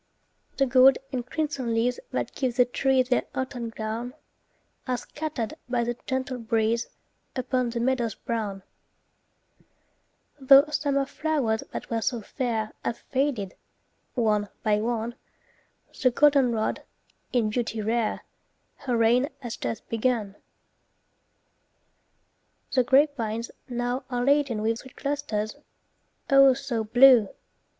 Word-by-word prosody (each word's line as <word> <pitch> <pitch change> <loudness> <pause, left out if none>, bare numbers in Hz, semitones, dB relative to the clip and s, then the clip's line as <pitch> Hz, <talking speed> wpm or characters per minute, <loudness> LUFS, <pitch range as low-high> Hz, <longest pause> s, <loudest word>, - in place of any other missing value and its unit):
The 275 - +3
gold 260 +1 +6
and 255 -3 -2
crimson 265 -4 -2
leaves 245 +2 +1
that - - -3
give 255 -3 -2
The 250 -1 +5
trees 260 0 +1
their 250 - +1
autumn 245 -3 -3
gown, 225 +3 -5 0.7
Are 250 -1 0
scattered 295 -6 -5 0.2
by 240 -1 +1
the 240 +1 -2
gentle 260 -1 -2
breeze 225 0 0 0.5
Upon 255 -1 0
the 235 0 -3
meadows 240 -2 0
brown. 205 -4 -4 1.8
Tho' 275 +1 +7
summer 280 -2 0
flow'rs 270 -7 -1
that - - -7
were 225 -1 0
so 240 +1 -1
fair 225 -2 -3
Have 235 - -2
faded, 260 -8 0 0.6
one 210 -4 +1
by 210 -1 +2
one, 230 0 -2 0.9
The 255 - +5
goldenrod, 250 -4 +2 0.5
in 225 -4 +1
beauty 225 -1 -2
rare, 220 +1 -1 0.6
Her 250 -4 -1
reign 240 +5 +3
has 240 -3 -5
just 225 - -5
begun. 225 -3 -1 2.4
The 255 - +3
grapevines 240 -4 +1 0.2
now 245 +1 -2
are 245 -1 -1
laden 275 -6 +2
with 225 +1 0
Sweet 260 - -14
clusters, 275 -6 -3 0.7
oh, 275 -1 +6
so 260 -4 -3
blue! 245 -1 +6
245 Hz, 120 wpm, -26 LUFS, 225-265 Hz, 2.4 s, Tho